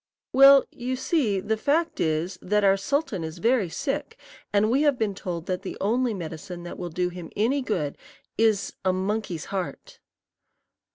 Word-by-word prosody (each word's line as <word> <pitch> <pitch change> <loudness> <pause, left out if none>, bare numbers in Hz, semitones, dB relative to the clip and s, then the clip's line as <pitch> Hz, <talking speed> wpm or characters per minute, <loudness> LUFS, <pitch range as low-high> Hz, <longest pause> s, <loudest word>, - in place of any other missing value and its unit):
"Well, 275 +1 +8
you 250 +1 -3
see, 255 - +1
the 220 +3 -1
fact 310 +8 0
is 160 +3 -1
that 210 +2 +1
our 195 -1 +5
sultan 205 - -1
is 160 0 -6
very 230 -5 +2
sick, 270 - -3 0.3
and 210 +2 +3
we 270 +4 +3
have 290 -3 +3
been 215 -3 0
told 175 -3 -5
that 185 0 -2
the 195 - -6
only 235 +3 +1
medicine 170 0 -7
that 175 - -8
will 175 - -4
do 180 +2 -1
him 175 -2 -8
any 250 +7 +1
good 175 - -2 0.4
is 220 -3 +2
a 185 -1 +2
monkey's 190 -3 -2
heart." 335 - -5
205 Hz, 170 wpm, -25 LUFS, 180-255 Hz, 0.4 s, Well